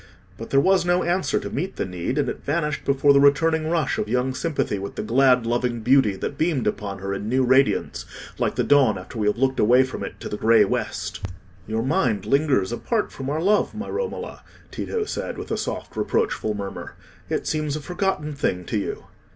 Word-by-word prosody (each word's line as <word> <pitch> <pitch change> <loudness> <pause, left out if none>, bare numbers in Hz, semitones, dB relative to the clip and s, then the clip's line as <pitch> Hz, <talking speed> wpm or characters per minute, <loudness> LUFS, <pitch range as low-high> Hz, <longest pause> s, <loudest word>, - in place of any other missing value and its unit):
But - - -8
there 135 - +4
was 190 +5 +4
no 175 +1 +2
answer 180 +2 +1
to - - -6
meet 185 +7 -3
the - - -2
need, 90 - -3
and 145 - +1
it - - -5
vanished 150 0 -1
before 140 +1 +4
the 140 - +5
returning 155 +3 +3
rush 165 -2 0
of 105 - -2
young 125 +2 0
sympathy 140 - -1
with 100 +1 -6
the - - -3
glad 125 +1 +4
loving 120 0 -1
beauty 125 -4 +4
that 135 +8 -5
beamed 155 -6 +1
upon 100 -1 -2
her 100 +1 -4
in 100 +2 -4
new 130 +2 +2
radiance, 130 +2 +2 0.4
like - - 0
the - - +1
dawn 135 -8 +4
after 95 +5 -8
we 105 - +1
have 105 - +1
looked 130 +1 +1
away 125 +4 +5
from 130 - -5
it - - -7
to - - -5
the 105 - -4
grey 115 +1 +5
west. - - -3 0.4
"Your 110 +1 -1
mind 125 -6 +1
lingers 135 -9 +2
apart 215 - -1
from 135 0 -6
our 150 +2 -1
love, 210 +3 +2
my 220 +2 -5
Romola," 470 +2 -4 0.3
Tito 450 -2 -2
said, - - -4
with - - -7
a - - +1
soft - - -5
reproachful 420 - 0
murmur. 100 -1 -6 0.3
"It - - -1
seems 155 -2 -1
a - - -3
forgotten 165 -1 -2
thing 90 -10 -2
to 105 - -1
you." - - -4
135 Hz, 210 wpm, -23 LUFS, 110-155 Hz, 0.4 s, the